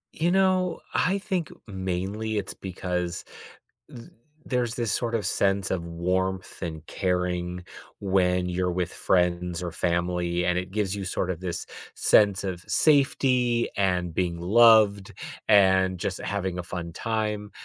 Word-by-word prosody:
You 170 Hz, +2 st, 0 dB
know, 185 Hz, -1 st, +2 dB
I 185 Hz, +2 st, +2 dB
think 185 Hz, -6 st, -2 dB, 0.2 s
mainly 95 Hz, +3 st, -3 dB
it's 100 Hz, -2 st, -3 dB
because 90 Hz, -2 st, -4 dB, 0.7 s
th 115 Hz, -, -11 dB, 0.4 s
there's 125 Hz, -3 st, -1 dB
this 115 Hz, -3 st, -1 dB
sort 120 Hz, -1 st, -1 dB
of 105 Hz, -4 st, -1 dB
sense 95 Hz, 0 st, +1 dB
of 85 Hz, -3 st, -2 dB
warmth 90 Hz, +2 st, -2 dB
and 80 Hz, -3 st, -5 dB
caring 90 Hz, -1 st, -2 dB, 0.4 s
when 90 Hz, -2 st, +1 dB
you're 90 Hz, 0 st, -1 dB
with 90 Hz, -1 st, -2 dB
friends 90 Hz, -1 st, 0 dB
or 85 Hz, -, -3 dB
family, 85 Hz, +1 st, -1 dB
and 90 Hz, 0 st, +1 dB
it 90 Hz, 0 st, -3 dB
gives 100 Hz, -2 st, -1 dB
you 100 Hz, -, -4 dB
sort 90 Hz, 0 st, -2 dB
of 85 Hz, -, -6 dB
this 90 Hz, -2 st, -4 dB, 0.3 s
sense 100 Hz, -2 st, +4 dB
of 90 Hz, -3 st, -4 dB
safety, 130 Hz, -5 st, +3 dB
and 90 Hz, -3 st, 0 dB
being 85 Hz, -1 st, -1 dB
loved, 105 Hz, 0 st, +5 dB, 0.3 s
and 95 Hz, -3 st, +4 dB
just 90 Hz, +2 st, -3 dB
having 95 Hz, -3 st, -3 dB
a -, -, -3 dB
fun 85 Hz, -1 st, -6 dB
time, 105 Hz, +1 st, -3 dB
95 Hz, 145 wpm, -26 LUFS, 90-110 Hz, 0.7 s, loved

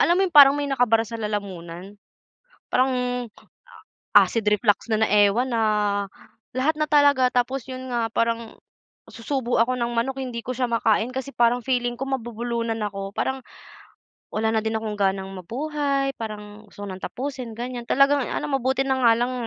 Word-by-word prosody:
alam 345 Hz, +2 st, +4 dB
mo 390 Hz, -, +3 dB
yung 355 Hz, -, -8 dB
parang 280 Hz, -1 st, +9 dB
may 290 Hz, -, -1 dB
nakabara 240 Hz, -4 st, +2 dB
sa 230 Hz, +1 st, -7 dB
lalamunan, 195 Hz, -3 st, -5 dB, 0.7 s
parang 260 Hz, +1 st, +2 dB, 1.2 s
acid 230 Hz, -2 st, +5 dB
reflux 210 Hz, +1 st, +1 dB
na 220 Hz, 0 st, +2 dB
na -, -, +3 dB
ewan, 210 Hz, +5 st, +3 dB
na 230 Hz, -1 st, +1 dB, 0.9 s
lahat 285 Hz, +5 st, 0 dB
na 305 Hz, -, +1 dB
talaga. 285 Hz, -3 st, +4 dB
Tapos, 250 Hz, +1 st, 0 dB
yun 260 Hz, 0 st, -7 dB
nga, 230 Hz, -2 st, -2 dB
parang 230 Hz, -1 st, -1 dB, 0.6 s
susubo 250 Hz, 0 st, -2 dB
ako 245 Hz, +2 st, +3 dB
ng 240 Hz, -1 st, -2 dB
manok 265 Hz, +3 st, -1 dB
hindi 245 Hz, -2 st, -5 dB
ko 250 Hz, +2 st, -5 dB
siya 260 Hz, -, -2 dB
makain 225 Hz, +1 st, +1 dB
kasi 265 Hz, +2 st, -6 dB
parang 240 Hz, +1 st, +3 dB
feeling 245 Hz, -2 st, 0 dB
ko 270 Hz, -, -4 dB
mabubulunan 235 Hz, -2 st, -3 dB
ako. 195 Hz, -2 st, -4 dB
Parang 265 Hz, +5 st, -2 dB, 0.9 s
wala 220 Hz, +1 st, -1 dB
na 220 Hz, -, +1 dB
din 220 Hz, 0 st, -1 dB
akong 220 Hz, -1 st, -4 dB
ganang 195 Hz, -1 st, 0 dB
mabuhay, 275 Hz, -, -2 dB
parang 210 Hz, -2 st, -8 dB
gusto 205 Hz, 0 st, -9 dB
ko -, -, -7 dB
ng 185 Hz, -, -12 dB
tapusin, 260 Hz, -2 st, -5 dB
ganiyan, 245 Hz, 0 st, -4 dB
talagang 275 Hz, +3 st, +3 dB
ano, 300 Hz, -, -2 dB
mabuti 270 Hz, -1 st, 0 dB
na 265 Hz, -, +2 dB
nga 230 Hz, -2 st, +6 dB
lang 245 Hz, +1 st, 0 dB
240 Hz, 170 wpm, -23 LUFS, 220-265 Hz, 1.2 s, parang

